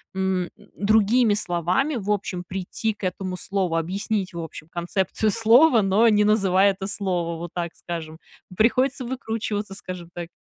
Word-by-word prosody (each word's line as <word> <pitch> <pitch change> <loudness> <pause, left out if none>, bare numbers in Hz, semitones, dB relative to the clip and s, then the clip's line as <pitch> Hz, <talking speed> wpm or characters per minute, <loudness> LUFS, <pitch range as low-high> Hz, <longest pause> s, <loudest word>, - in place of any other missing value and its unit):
м, 190 -2 0 0.3
другими 215 +2 +3
словами 185 - 0
в 205 -2 -5
общем 195 -3 -1
прийти 195 +4 -3
к 210 - -18
этому 185 0 -3
слову, 190 -3 -1
объяснить 190 +4 -2
в 170 - -5
общем 160 -1 -8
концепцию 190 +4 -1
слова, 230 +3 +5
но 195 +4 +4
не 210 -2 +4
называя 200 -2 +4
это 195 0 -6
слово, 175 -5 -2
вот 170 0 -7
так 170 -1 -4
скажем. 160 -2 -6 0.4
Приходится 255 +3 +2
выкручиваться, 220 -5 -3
скажем 185 -3 -7
так. 175 -1 -6
195 Hz, 150 wpm, -24 LUFS, 175-220 Hz, 0.4 s, слова